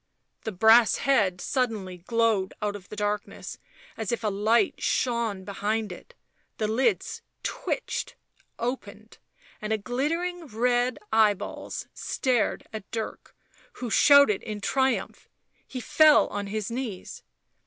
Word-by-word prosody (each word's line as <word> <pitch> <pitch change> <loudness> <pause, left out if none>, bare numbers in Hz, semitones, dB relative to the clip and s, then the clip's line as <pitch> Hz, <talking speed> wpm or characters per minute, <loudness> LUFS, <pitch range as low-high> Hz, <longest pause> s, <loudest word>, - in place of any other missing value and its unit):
The 220 - -2
brass 220 +4 +6
head 205 -10 +2
suddenly 215 -7 -2
glowed 220 0 +1
out 205 -1 -2
of 190 -2 -11
the - - -7
darkness 210 0 -3 0.4
as 220 -3 -3
if 235 - -2
a 215 - +2
light 215 - +2
shone 235 -6 0
behind 210 +1 -2
it; 180 - -12 0.4
the 215 - 0
lids 250 - 0 0.2
twitched, - - -3 0.4
opened, 225 -3 -5 0.4
and 215 -1 -2
glittering 330 +8 -2
red 245 +1 +1 0.2
eyeballs 215 -3 +1
stared 250 -4 0
at 215 -3 -7
Dirk, 225 -1 -6 0.4
who 245 -3 -6
shouted 280 -8 +6
in 210 -1 -5
triumph. 265 +6 -1 0.4
He 255 - -6
fell 305 +4 +5
on 205 0 -4
his 215 +1 -3
knees. 230 -6 -5
220 Hz, 120 wpm, -27 LUFS, 205-250 Hz, 0.4 s, brass